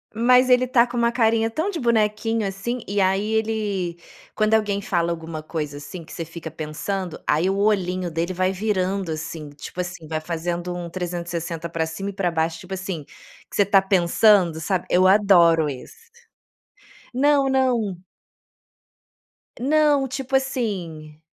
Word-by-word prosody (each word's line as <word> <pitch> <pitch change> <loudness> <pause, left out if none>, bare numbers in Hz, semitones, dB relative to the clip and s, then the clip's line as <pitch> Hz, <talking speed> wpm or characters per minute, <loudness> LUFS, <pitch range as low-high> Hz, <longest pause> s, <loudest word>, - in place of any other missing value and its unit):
Mas 250 +2 +4
ele 250 0 +5
está 245 -1 +4
com 240 0 -6
uma 235 0 +2
carinha 225 -1 +2
tão 320 - -1
de 350 - -4
bonequinho, 225 -2 +1
assim, 215 +6 -3
e 200 +1 -1
aí 195 +3 +1
ele 205 -6 -1 0.3
quando 215 0 +2
alguém 205 -2 0
fala 170 -3 0
alguma 160 -2 -6
coisa, 150 -3 -4
assim, 165 +4 -8
que - - -15
você 165 - -5
fica 165 0 -8
pensando, 160 +4 -4
aí 165 +5 +2
o 195 - +1
olhinho 185 -4 +1
dele 165 +3 -2
vai 185 +1 +1
virando 190 -3 -1
assim, 155 -1 -6
tipo 145 +5 -10
assim, 175 -3 -5
vai 155 0 -2
fazendo 175 +2 -3
um 175 -1 -5
360 170 -2 -4
para 165 -1 -1
cima 180 +5 -5
e - - -6
para 185 -3 -1
baixo, 165 0 -1
tipo 190 +1 -8
assim, 185 -4 -4 0.5
que - - -9
você - - +3
está 195 -1 +5
pensando, 185 -2 +4
sabe 180 +2 -2
eu 185 +1 +4
adoro 170 -6 +5
esse. 455 - -10 1.1
Não, 275 +1 +3
não. 245 -8 +1 1.6
Não, 290 0 +3
tipo 270 0 -3
assim, 180 - -2
190 Hz, 160 wpm, -23 LUFS, 170-225 Hz, 1.6 s, ele